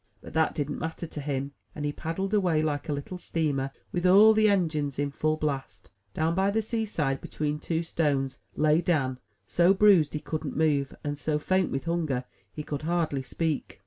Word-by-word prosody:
But - - -12
that 160 0 +2
didn't 145 -1 -2
matter 160 +1 -4
to 155 -2 -7
him; 140 -1 -2 0.2
and 150 - -4
he 145 - 0
paddled 190 +7 -3
away, 180 -7 +2
like 150 +1 -2
a - - +1
little 145 +6 -5
steamer 145 -6 -1 0.2
with 175 - -2
all 205 +4 +8
the 215 0 +4
engines 155 -8 0
in 145 0 -1
full 155 +2 0
blast. 135 -10 -4 0.2
Down 160 +1 +1
by 190 +2 +2
the 220 +2 0
seaside, 205 - -1
between 150 0 -3
two 165 +1 -1
stones, 140 -5 -1 0.2
lay 155 +2 +3
Dan, 135 -8 0 0.3
so 175 +3 +4
bruised 190 -8 +5
he - - -1
couldn't 155 -1 -4
move, 145 -3 +1
and 145 0 -3
so 150 0 0
faint 185 +4 +1
with 135 - -3
hunger 160 -7 -1 0.3
he 150 - -6
could 145 -1 -4
hardly 160 -4 0
speak. 140 - -3
155 Hz, 190 wpm, -27 LUFS, 145-175 Hz, 0.3 s, all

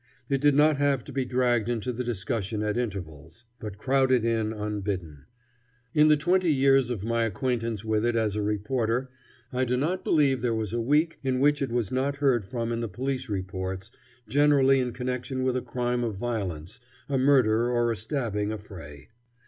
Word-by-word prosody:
It 135 -1 +1
did 145 -1 +4
not 150 0 +5
have 140 -3 +1
to - - -10
be 135 -1 -1
dragged 120 -3 +1
into 120 +1 -2
the 125 +2 -3
discussion 110 -2 -3
at 105 0 -1
intervals, 90 -5 -5
but 105 -2 -7
crowded 130 -2 +2
in 110 -2 0
unbidden. 100 -8 -4 0.7
In 150 0 +5
the 150 0 +5
twenty 175 +3 +2
years 135 -2 +4
of 110 -6 -3
my 115 +1 0
acquaintance 115 -1 -2
with 110 -1 +1
it 120 0 +1
as 110 -3 0
a 105 - -1
reporter 115 +4 -1 0.4
I 130 +1 +1
do 125 0 0
not 165 +8 -1
believe 135 -5 +2
there 120 -2 0
was 110 -2 -3
a 120 - 0
week 150 +7 +1
in 130 -1 0
which 145 +1 +3
it 135 - 0
was 120 -5 -1
not 135 +2 0
heard 135 -7 +2
from 115 +1 -3
in 115 - -1
the 115 - -3
police 130 +3 -3
reports, 95 -1 -4 0.4
generally 140 -2 +4
in 125 -1 -1
connection 130 +1 -3
with 130 -1 +1
a 130 - 0
crime 120 0 -2
of 110 -4 -2
violence, 100 -4 -4 0.3
a 135 -2 0
murder 120 -4 +4
or 120 -1 +1
a - - -1
stabbing 110 -3 -2
affray. 85 -10 -9
120 Hz, 190 wpm, -27 LUFS, 105-135 Hz, 0.7 s, not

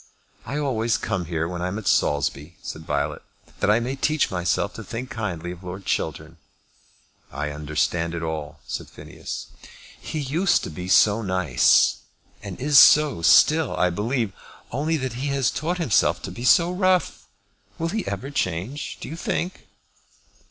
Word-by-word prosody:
"I 140 +5 -3
always 120 -6 0
come 90 -4 -2
here 80 -1 -2
when 90 0 -5
I 90 - -1
am 95 +3 -3
at 110 - -6
Saulsby," 75 +3 0
said 80 0 -7
Violet, - - -1 0.4
"that 105 - +1
I 105 +2 +5
may 125 +3 -3
teach 155 +2 +1
myself 90 -2 0
to - - -8
think 125 +3 -6
kindly 90 -6 -4
of 90 +1 -10
Lord 90 +2 -7
Chiltern." 80 +1 -3 0.9
"I 75 0 -3
understand 75 +3 -1
it 85 - -4
all," 80 -2 -5
said - - -5
Phineas. - - -8 0.5
"He - - -5
used 155 +6 +1
to - - -5
be 90 +4 -6
so 105 +3 +5
nice; 90 - +3 0.4
and 100 -3 -8
is 140 0 +6
so 150 - +6
still, 155 - +5
I 90 0 +2
believe, 110 +2 -1 0.4
only 155 +6 0
that 130 -4 -3
he 145 - -1
has 140 -2 +1
taught 170 +4 -2
himself 135 -12 +2
to - - -5
be 120 - -6
so 170 +6 +5
rough. 185 -1 +1 0.5
Will 165 +1 -2
he 215 +4 -3
ever 135 +2 -4
change, 125 - -3
do - - -6
you 155 - -6
think?" 175 +2 -3
110 Hz, 165 wpm, -24 LUFS, 85-145 Hz, 0.9 s, is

